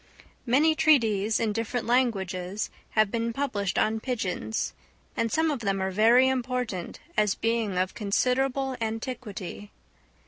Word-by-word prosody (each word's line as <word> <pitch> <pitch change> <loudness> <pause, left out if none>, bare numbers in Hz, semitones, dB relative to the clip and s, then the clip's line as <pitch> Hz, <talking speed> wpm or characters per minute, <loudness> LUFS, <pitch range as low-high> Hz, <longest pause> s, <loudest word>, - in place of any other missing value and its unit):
Many 295 +7 +4
treatises 225 -9 +3
in 220 -2 0
different 230 +2 -2
languages 200 -6 0 0.3
have 215 -2 +4
been 230 0 -1
published 215 -8 -2
on 220 +1 +2
pigeons, 220 -3 -2 0.4
and 230 -1 0
some 320 0 +2
of 280 - -2
them 195 -3 -1
are 190 0 -1
very 230 +6 +5
important, 250 -7 -2 0.2
as 210 -2 +2
being 225 -4 -1
of 185 0 0
considerable 260 +5 0
antiquity. 220 -3 -5
225 Hz, 130 wpm, -27 LUFS, 205-250 Hz, 0.4 s, very